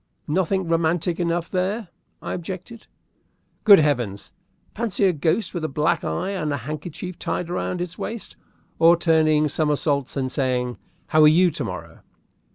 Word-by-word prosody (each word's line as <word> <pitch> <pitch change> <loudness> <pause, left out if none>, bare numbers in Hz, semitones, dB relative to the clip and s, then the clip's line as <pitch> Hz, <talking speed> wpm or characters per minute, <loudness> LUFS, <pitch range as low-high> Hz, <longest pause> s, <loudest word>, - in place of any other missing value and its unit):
"Nothing 185 +3 0
romantic 165 +1 0
enough 170 -1 0
there," 190 +2 -1 0.3
I - - -3
objected. 185 +6 -7 0.8
"Good 205 -3 +10
heavens! 125 -10 0 0.4
Fancy 210 -3 0
a 185 - +4
ghost 160 +8 0
with 175 -3 -4
a - - 0
black 155 +4 0
eye 185 +3 -2
and 165 -7 -2
a 140 - -1
handkerchief 155 +7 -6
tied 175 -1 -3
round 180 0 -2
its 180 -1 -5
waist, 230 -1 -6 0.4
or 170 +1 +6
turning 155 -2 +3
somersaults, 145 -2 0
and 130 -1 -1
saying, 125 -3 -1 0.3
'How 155 -1 +4
are 155 - +8
you 175 +3 +5
to - - -4
morrow?'" - - -7
165 Hz, 155 wpm, -23 LUFS, 150-180 Hz, 0.8 s, Good